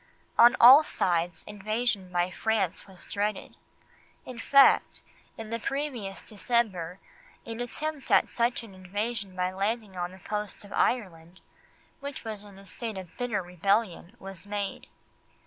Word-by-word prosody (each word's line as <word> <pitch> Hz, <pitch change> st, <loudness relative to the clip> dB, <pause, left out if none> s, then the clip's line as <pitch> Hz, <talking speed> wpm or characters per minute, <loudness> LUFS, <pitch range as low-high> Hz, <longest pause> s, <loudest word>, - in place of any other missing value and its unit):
On 240 Hz, +1 st, +7 dB
all 265 Hz, +6 st, +10 dB
sides 170 Hz, -, -1 dB
invasion 210 Hz, -1 st, -2 dB
by 175 Hz, 0 st, 0 dB
France 200 Hz, -4 st, -1 dB
was 190 Hz, -3 st, -14 dB
dreaded; 205 Hz, 0 st, -3 dB, 0.7 s
in 250 Hz, -2 st, -8 dB
fact, 275 Hz, +4 st, +5 dB, 0.3 s
in 225 Hz, -1 st, -8 dB
the 230 Hz, -, -2 dB
previous 245 Hz, -6 st, -4 dB
December 200 Hz, -6 st, -1 dB, 0.5 s
an 230 Hz, 0 st, -6 dB
attempt 290 Hz, +4 st, -4 dB
at -, -, +5 dB
such 240 Hz, 0 st, 0 dB
an 215 Hz, -4 st, -12 dB
invasion 200 Hz, +2 st, -4 dB
by 180 Hz, 0 st, 0 dB
landing 205 Hz, +1 st, -2 dB
on 175 Hz, 0 st, -3 dB
the 185 Hz, -, -12 dB
coast 210 Hz, +2 st, -5 dB
of 205 Hz, -, -11 dB
Ireland, 185 Hz, -6 st, -1 dB, 0.6 s
which 280 Hz, -3 st, -7 dB
was 215 Hz, -2 st, -5 dB
in 200 Hz, -2 st, -14 dB
a 195 Hz, -, -14 dB
state 220 Hz, +1 st, -6 dB
of 185 Hz, -3 st, -9 dB
bitter 240 Hz, -6 st, -1 dB
rebellion, 185 Hz, +2 st, -1 dB
was 195 Hz, -2 st, -10 dB
made. 205 Hz, -1 st, -4 dB
205 Hz, 145 wpm, -28 LUFS, 185-235 Hz, 0.7 s, all